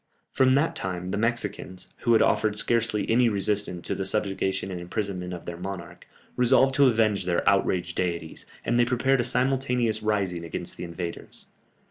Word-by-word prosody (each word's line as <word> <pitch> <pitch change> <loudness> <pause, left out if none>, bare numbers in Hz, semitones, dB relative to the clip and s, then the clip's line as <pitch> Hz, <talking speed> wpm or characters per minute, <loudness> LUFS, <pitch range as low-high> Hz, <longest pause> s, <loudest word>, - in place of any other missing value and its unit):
From 130 0 +3
that 145 +4 +1
time 90 -1 -4
the 100 - -1
Mexicans, 105 -5 -3
who 120 - +1
had 110 - +5
offered 105 -1 +1
scarcely 115 -1 +1
any 120 +1 +4
resistance 100 -3 +1
to - - -2
the 95 - -3
subjugation 95 -1 -1
and 90 -1 -5
imprisonment 90 -1 -4
of 90 -1 -7
their 85 -1 -6
monarch, 95 -1 -8 0.3
resolved 130 +2 +4
to 140 0 +5
avenge 110 -5 +2
their 90 -1 0
outraged 90 -3 +1
deities, 85 -3 -3 0.2
and 120 +1 +1
they - - +6
prepared 125 +2 +2
a - - -1
simultaneous 125 -3 +1
rising 100 -5 -1
against 85 +1 -6
the - - -6
invaders. 85 0 -7
105 Hz, 170 wpm, -26 LUFS, 90-120 Hz, 0.3 s, they